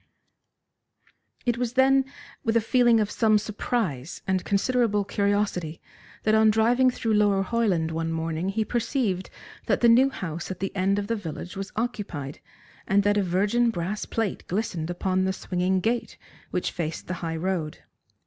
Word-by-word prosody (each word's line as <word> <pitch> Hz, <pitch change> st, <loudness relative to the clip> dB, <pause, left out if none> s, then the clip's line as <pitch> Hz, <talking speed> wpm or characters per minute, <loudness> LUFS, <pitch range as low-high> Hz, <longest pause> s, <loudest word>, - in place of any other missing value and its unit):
It 240 Hz, -1 st, 0 dB
was, 245 Hz, -1 st, -1 dB
then, 265 Hz, +1 st, +4 dB, 0.4 s
with 225 Hz, 0 st, +2 dB
a -, -, +5 dB
feeling 240 Hz, 0 st, +4 dB
of 210 Hz, -1 st, 0 dB
some 215 Hz, -2 st, +3 dB
surprise 205 Hz, -, -3 dB
and 190 Hz, -1 st, 0 dB
considerable 210 Hz, 0 st, +1 dB
curiosity 200 Hz, -5 st, -1 dB, 0.4 s
that 215 Hz, -, +2 dB
on 220 Hz, 0 st, +5 dB
driving 235 Hz, +4 st, +4 dB
through 230 Hz, -3 st, -1 dB
Lower 205 Hz, -2 st, +3 dB
Hoyland 195 Hz, -7 st, 0 dB
one 165 Hz, 0 st, -2 dB
morning 165 Hz, +2 st, -2 dB
he 215 Hz, +2 st, -1 dB
perceived 230 Hz, -6 st, -1 dB, 0.4 s
that -, -, +1 dB
the 240 Hz, -, +6 dB
new 255 Hz, +4 st, +6 dB
house 170 Hz, -, -5 dB
at 185 Hz, -1 st, -5 dB
the 195 Hz, +1 st, -3 dB
end 195 Hz, +1 st, +1 dB
of 205 Hz, -, -1 dB
the 230 Hz, +3 st, -1 dB
village 180 Hz, -3 st, -6 dB
was 195 Hz, 0 st, -5 dB
occupied, 200 Hz, -, -4 dB, 0.5 s
and 200 Hz, +1 st, +3 dB
that 205 Hz, 0 st, +3 dB
a -, -, +3 dB
virgin 205 Hz, +6 st, +2 dB
brass 190 Hz, +1 st, -3 dB
plate 225 Hz, -4 st, -2 dB
glistened 180 Hz, -4 st, -2 dB
upon 185 Hz, +1 st, 0 dB
the 190 Hz, -, 0 dB
swinging 185 Hz, 0 st, 0 dB
gate 235 Hz, +4 st, -1 dB, 0.3 s
which 180 Hz, -, -2 dB
faced 165 Hz, -2 st, -4 dB
the 180 Hz, -, -4 dB
high 165 Hz, -1 st, -2 dB
road. 165 Hz, -3 st, -3 dB
200 Hz, 165 wpm, -26 LUFS, 180-225 Hz, 0.5 s, the